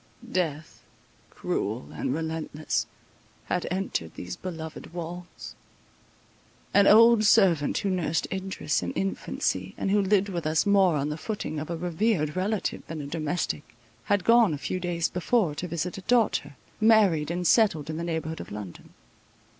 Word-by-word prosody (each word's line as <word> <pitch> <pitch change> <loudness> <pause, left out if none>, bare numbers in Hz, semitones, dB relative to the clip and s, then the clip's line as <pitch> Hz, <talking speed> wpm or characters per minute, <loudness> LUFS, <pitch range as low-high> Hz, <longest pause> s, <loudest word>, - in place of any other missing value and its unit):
Death, 165 -4 -2 0.5
cruel 110 +5 -3
and - - -2
relentless, 160 0 -2 0.6
had 180 - -2
entered 180 - -3
these 90 0 -6
beloved 160 -2 -8
walls. 175 +1 -7 1.2
An 200 -1 +6
old 230 +1 +7
servant, 190 -9 +4
who 200 - -1
had 185 - 0
nursed 155 +1 0
Idris 190 -6 -2
in 90 0 -4
infancy, 95 -1 -2
and 195 - -1
who 205 0 +4
lived 200 0 +2
with 170 -4 -3
us 155 0 +2
more 195 -4 +4
on 145 0 -1
the 150 - -3
footing 205 -7 -4
of 155 - -6
a 170 - -3
revered 175 -2 0
relative 195 +3 -1
than 160 -1 -6
a 145 - -5
domestic, 155 -2 -3 0.3
had 205 -2 +1
gone 230 -8 +5
a 140 -1 -9
few 185 - -1
days 175 -2 -1
before 180 -1 +1
to 175 +5 -5
visit 170 +4 -3
a - - -10
daughter, 210 - +1 0.2
married, 210 -9 +4
and 175 +1 -2
settled 170 -7 +3
in 155 0 -4
the 170 - -3
neighbourhood 160 -1 -3
of - - -10
London. 100 -4 -9
170 Hz, 160 wpm, -27 LUFS, 150-195 Hz, 1.2 s, old